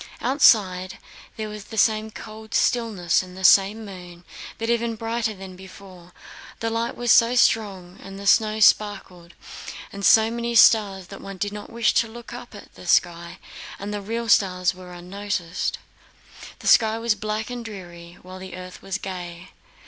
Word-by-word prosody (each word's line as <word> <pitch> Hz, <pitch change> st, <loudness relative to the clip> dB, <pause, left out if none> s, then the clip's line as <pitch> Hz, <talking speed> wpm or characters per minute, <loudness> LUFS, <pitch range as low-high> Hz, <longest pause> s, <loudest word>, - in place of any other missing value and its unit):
Outside, 205 Hz, -8 st, +3 dB, 0.4 s
there 215 Hz, -1 st, -4 dB
was 210 Hz, -1 st, -9 dB
the 220 Hz, -, -10 dB
same 215 Hz, +1 st, +2 dB
cold 220 Hz, 0 st, -9 dB
stillness 215 Hz, -8 st, +1 dB
and 185 Hz, 0 st, -12 dB
the 190 Hz, -, -8 dB
same 200 Hz, +4 st, +5 dB
moon, 180 Hz, -3 st, -11 dB, 0.3 s
but 225 Hz, -, -4 dB
even 235 Hz, -1 st, 0 dB
brighter 225 Hz, 0 st, -2 dB
than 190 Hz, -1 st, -10 dB
before. 185 Hz, -1 st, -14 dB, 0.5 s
The 225 Hz, 0 st, -2 dB
light 230 Hz, +1 st, -2 dB
was 240 Hz, -1 st, +1 dB
so 235 Hz, +2 st, +5 dB
strong 195 Hz, -7 st, +1 dB
and 195 Hz, 0 st, -10 dB
the 200 Hz, -, -9 dB
snow 215 Hz, +1 st, +3 dB
sparkled 190 Hz, -5 st, +1 dB, 0.6 s
with 200 Hz, 0 st, -7 dB
so 220 Hz, +2 st, +5 dB
many 235 Hz, 0 st, -3 dB
stars 200 Hz, -4 st, +5 dB
that 195 Hz, -, -10 dB
one 195 Hz, -1 st, -9 dB
did 205 Hz, +2 st, -3 dB
not 210 Hz, 0 st, -8 dB
wish 230 Hz, -1 st, +1 dB
to 230 Hz, -, +2 dB
look 235 Hz, +2 st, -11 dB
up 245 Hz, -2 st, -10 dB
at 205 Hz, -, -13 dB
the 180 Hz, -, -13 dB
sky 170 Hz, -1 st, +1 dB, 0.4 s
and 205 Hz, +1 st, -6 dB
the 205 Hz, -, -4 dB
real 230 Hz, +3 st, -4 dB
stars 185 Hz, -4 st, +3 dB
were 180 Hz, -1 st, -12 dB
unnoticed. 180 Hz, 0 st, -4 dB, 0.8 s
The -, -, -8 dB
sky 220 Hz, -1 st, +5 dB
was 230 Hz, -1 st, +1 dB
black 215 Hz, +2 st, -4 dB
and 245 Hz, -1 st, -5 dB
dreary, 175 Hz, -5 st, -10 dB
while 185 Hz, +1 st, -10 dB
the 185 Hz, -1 st, -9 dB
earth 185 Hz, 0 st, -10 dB
was 195 Hz, 0 st, -4 dB
gay. 180 Hz, -2 st, -8 dB
205 Hz, 170 wpm, -23 LUFS, 185-225 Hz, 0.8 s, same